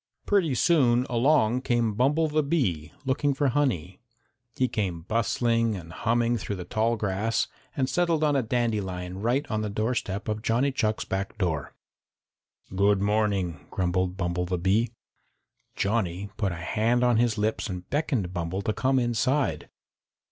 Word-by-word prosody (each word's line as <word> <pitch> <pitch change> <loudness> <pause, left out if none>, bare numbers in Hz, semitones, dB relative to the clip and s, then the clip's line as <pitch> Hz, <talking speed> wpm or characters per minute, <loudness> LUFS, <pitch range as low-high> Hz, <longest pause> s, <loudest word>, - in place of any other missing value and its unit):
Pretty 180 -10 +2
soon 125 -5 +3
along 125 -1 +3
came 120 -4 +1
Bumble 145 +8 +2
the 155 0 +1
Bee, 125 - -1
looking 140 +1 +1
for 145 0 +2
honey. 105 - -1 0.6
He 130 - +2
came 95 -8 -2
bustling 115 +2 +1
and 85 -3 -9
humming 120 +3 +1
through 100 -1 -4
the 90 -2 -7
tall 115 +4 +1
grass 105 +1 0 0.3
and 130 -2 +1
settled 170 0 +1
on 150 -2 +3
a 135 - +3
dandelion 100 -6 -2
right 125 +7 +1
on 110 0 0
the 105 - -2
doorstep 110 -1 -2
of 110 0 -2
Johnny 120 +5 +1
Chuck's 110 -4 -1
back 95 +3 -3
door. 80 -8 -2 1.0
"Good 100 +1 +3
morning," 100 -4 0
grumbled 90 0 -1
Bumble 90 -1 -1
the 90 0 -1
Bee. 100 +7 +2 0.9
Johnny 100 -2 -1
put 100 -3 -1
a - - -4
hand 110 +8 +1
on 120 -2 +4
his 115 -1 +2
lips 110 +1 -1
and 90 -1 -6
beckoned 135 - -1
Bumble 90 +3 -3
to 110 - 0
come 130 +3 +1
inside. 130 +3 0
110 Hz, 155 wpm, -26 LUFS, 95-125 Hz, 1.0 s, on